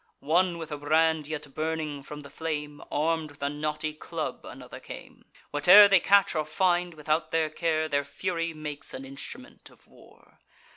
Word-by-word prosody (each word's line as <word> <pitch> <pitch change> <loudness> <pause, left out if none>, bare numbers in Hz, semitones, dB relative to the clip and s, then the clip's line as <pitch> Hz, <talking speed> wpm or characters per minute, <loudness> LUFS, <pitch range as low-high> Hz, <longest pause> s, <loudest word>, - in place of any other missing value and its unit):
One 175 +3 +2
with 160 -1 -7
a 150 - -4
brand 155 +1 +2
yet 150 -2 -6
burning 155 -2 -3
from 150 +2 -9
the 140 -1 -13
flame, 150 -1 -4
Arm'd 160 +1 0
with 145 0 -11
a 140 - +1
knotty 150 +1 -3
club 150 - -5
another - - -10
came: - - -11 0.3
Whate'er 180 +8 +8
they 195 -2 +5
catch 200 +2 +4
or 155 -2 0
find, 175 +2 0
without 155 +1 -1
their 160 -1 0
care, 155 -1 0
Their 140 -2 0
fury 170 +2 -3
makes 150 -2 -6
an 135 - -7
instrument 140 - -10
of - - -23
war. - - -21
155 Hz, 175 wpm, -27 LUFS, 150-165 Hz, 0.3 s, Whate'er